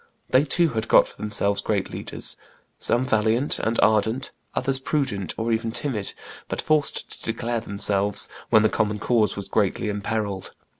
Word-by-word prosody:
They 130 +3 +5
too 170 +3 +4
had 115 -4 -3
got - - +6
for - - -15
themselves 105 -1 +1
great - - -1
leaders, - - -1 0.4
some 120 +2 +1
valiant 115 +3 +1
and 115 +1 -1
ardent, 110 +5 +2 0.2
others 135 +1 0
prudent 130 - -2
or 115 +1 -1
even 115 0 0
timid, 110 -5 -2 0.3
but - - -4
forced 155 -2 +1
to - - 0
declare 120 +1 -2
themselves 100 -1 0 0.2
when 110 - +5
the 110 - +4
common 105 0 0
cause 110 0 +1
was 100 -1 -5
greatly 105 +1 0
imperilled. 100 -1 -3
110 Hz, 160 wpm, -24 LUFS, 105-125 Hz, 0.4 s, got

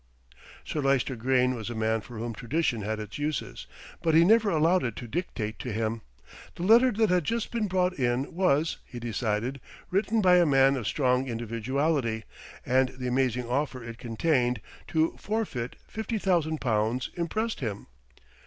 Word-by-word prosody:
Sir 150 - -2
Lyster 135 -1 +1
Grayne 125 +2 +2
was 115 -2 -5
a 120 - -5
man 110 0 0
for 120 +2 -10
whom 115 +1 -4
tradition 125 0 -1
had 110 +1 -3
its 105 +4 -7
uses; 150 0 -3 0.3
but 160 -1 +2
he 165 +1 +7
never 220 +1 +5
allowed 170 +2 +3
it 115 -4 -2
to 120 - -7
dictate 110 - -4
to 125 - -4
him. 110 +1 -2 0.5
The 170 - -5
letter 235 +6 +6
that 220 -2 +2
had 180 -2 +3
just 230 +7 -2
been 230 -3 0
brought 185 -1 +1
in 125 +1 0
was, 165 -3 +2
he 120 - -9
decided, 115 +3 -2 0.3
written 210 +4 +1
by 180 -3 +6
a 175 - +6
man 135 -1 +5
of 120 -6 -3
strong 130 -2 +1
individuality, 115 +1 -1 0.4
and 130 +1 +3
the 130 - -5
amazing 125 -1 0
offer 130 -1 -1
it 115 0 -8
contained, 125 0 +1 0.3
to 160 0 +1
forfeit 200 - -3
fifty 220 +1 -3
thousand 170 -6 +1
pounds, 115 +1 0
impressed 215 +6 -2
him. 105 -6 -4
130 Hz, 170 wpm, -28 LUFS, 115-170 Hz, 0.5 s, he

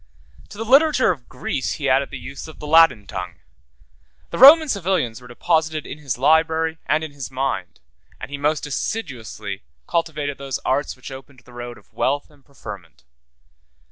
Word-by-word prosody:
To - - -11
the 225 - -4
literature 275 -1 +5
of 135 -8 -8
Greece 130 +1 -3
he 145 - -3
added 135 +1 +2
the - - -7
use 140 +3 -8
of 160 - -12
the - - -9
Latin 160 -9 +5
tongue; 90 -3 -6 1.0
the - - -4
Roman 310 +5 +10
civilians 180 - -1
were 125 - -13
deposited 155 +4 0
in 145 - -8
his 135 -5 -3
library 160 +3 +2
and 155 +2 +2
in 155 - -6
his 140 -3 -7
mind; 130 -9 -3 0.4
and - - -8
he 140 - -4
most 150 +2 0
assiduously 115 - -4 0.2
cultivated 150 -4 -2
those 135 -2 -3
arts 135 +2 0
which 130 +1 -10
opened 130 -1 -11
the 125 0 -18
road 120 0 -7
of - - -22
wealth 145 +3 -1
and 145 -2 -23
preferment. 100 - -11
140 Hz, 175 wpm, -22 LUFS, 125-160 Hz, 1.0 s, Roman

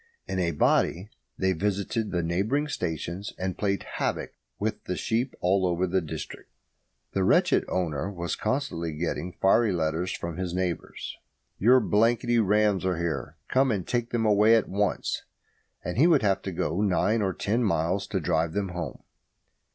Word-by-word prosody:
In 95 - -2
a 85 -2 +1
body 90 +5 +1 0.3
they 95 0 +2
visited 100 +4 -1
the 90 -2 -1
neighbouring 105 - 0
stations, 90 - -4
and 95 -1 -2
played 100 -1 -1
havoc - - -3 0.3
with - - -3
the - - -2
sheep 120 +4 -1
all 95 +2 +2
over 90 0 +1
the 95 +1 +1
district. 80 - -7 0.6
The 95 - +1
wretched - - +3
owner 85 -2 -1
was 85 -3 -3
constantly 105 - -2
getting 85 +3 -3
fiery 105 +5 +3
letters 85 +1 -1
from 85 -3 -5
his 90 -2 -3
neighbours: 90 -2 -3 0.4
"Your 125 +5 +6
blanky 120 +2 +2
rams 105 -2 +3
are 90 -2 0
here. 80 -6 -3
Come 135 +1 +3
and 100 -6 -1
take 120 -1 -1
them 115 -2 0
away 105 +2 +5
at 115 - +2
once," 100 0 -1 0.6
and 90 +6 -3
he 160 - +7
would 155 -8 +4
have 100 -2 +2
to 95 - -4
go 85 +1 -1
nine 105 +3 +2
or 95 -2 +1
ten 110 +6 0
miles 95 -1 0
to 95 - -1
drive 80 -1 0
them 100 0 -1
home. 85 -6 -6
95 Hz, 165 wpm, -27 LUFS, 85-105 Hz, 0.6 s, he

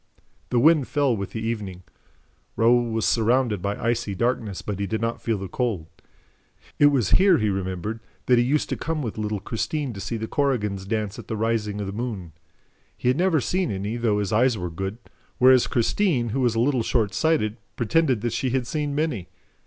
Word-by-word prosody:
The 125 - +1
wind 150 0 +5
fell 140 -5 +1
with 100 -2 -4
the 110 0 -5
evening. 100 -6 -4 0.7
Raoul 120 +1 +3
was 110 -1 -1
surrounded 115 -3 +2
by 100 +2 -2
icy 115 -3 -1
darkness, 110 -3 -1
but 100 -2 -4
he 100 - -1
did 110 +3 -2
not 115 +1 -2
feel 115 -2 0
the 95 0 -5
cold. 105 -5 -2 0.9
It 145 - +7
was 130 -9 +2
here, 190 -2 +6
he 105 -1 +1
remembered, 95 +3 -3 0.3
that 125 -1 +4
he - - +4
used 145 +5 +1
to - - -1
come 155 -1 -3
with 110 -2 -4
little 105 -1 -2
Christine 125 +6 -3
to 100 - -8
see 105 +4 -3
the 110 0 -4
Korrigans 105 -10 -1
dance 105 -1 -2
at - - -10
the 110 - -3
rising 105 -2 -1
of 100 - -3
the 95 - -5
moon. 105 -7 -4 0.7
He 125 - 0
had 130 - +2
never 175 -3 +3
seen 180 +5 0
any, 100 +3 -3
though 115 -3 +1
his 105 0 -1
eyes 120 +1 +3
were 90 -2 -4
good, 95 +5 -4 0.4
whereas 130 0 +6
Christine, 125 - +1
who 130 +5 -1
was 120 -3 +2
a - - +1
little 130 +1 +2
shortsighted, 110 +2 +1 0.2
pretended 130 -1 +1
that 120 0 -2
she 130 - -1
had 130 0 0
seen 145 +2 -2
many. 145 - -1
115 Hz, 200 wpm, -24 LUFS, 105-130 Hz, 0.9 s, It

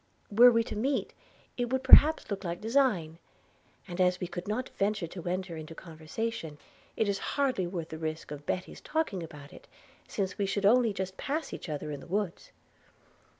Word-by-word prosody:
Were 240 +4 +9
we 230 -1 +3
to 215 - -6
meet, 260 +6 -1 0.4
it 245 -1 -1
would 260 0 0
perhaps 295 +1 +7
look 200 0 -3
like 175 -1 -3
design; 215 - +1 0.7
and 180 0 -3
as 180 0 +3
we - - -2
could 175 +1 -6
not 240 +5 -2
venture 205 -2 -1
to 170 +1 -8
enter 180 -1 -3
into 160 0 -8
conversation, 160 +1 -5 0.4
it 220 - +2
is 200 -1 0 0.2
hardly 260 -10 +1
worth 175 -3 -5
the 160 - -7
risk 155 -1 -4
of 145 0 -8
Betty's 185 - -3
talking 310 - -1
about 150 -3 -10
it, - - -14 0.4
since 195 -1 -3
we 200 - +1
should 195 +1 -1
only 235 +1 +5
just 190 -1 -4
pass 305 +3 -3
each - - -7
other 150 0 -4
in 145 - -5
the - - -12
woods.' 195 0 -3
190 Hz, 190 wpm, -30 LUFS, 165-230 Hz, 0.7 s, Were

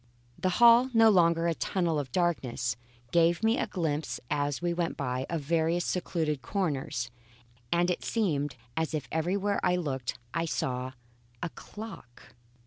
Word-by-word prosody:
The 185 - +1
hall, 240 +2 +7
no 225 -1 +7
longer 170 -3 +4
a 170 - +2
tunnel 170 -2 0
of 135 -3 -5
darkness, 125 -10 0 0.4
gave 170 +3 +3
me 225 +3 +3
a - - 0
glimpse 155 -8 -2
as 145 -1 0
we 175 0 0
went 170 -1 -2
by, 130 -1 -2
of 165 -2 -1
various 165 +3 +1
secluded 160 -6 -1
corners, 135 - -2 0.6
and 175 +1 +3
it 175 - -3
seemed 145 - 0 0.2
as 160 -1 -1
if 140 -5 -3
everywhere 195 +5 0
I 180 -1 +3
looked 135 -8 -3 0.2
I 165 +1 0
saw 130 -4 -2 0.5
a 170 - -1
clock. 195 - -11
165 Hz, 150 wpm, -29 LUFS, 145-180 Hz, 0.6 s, hall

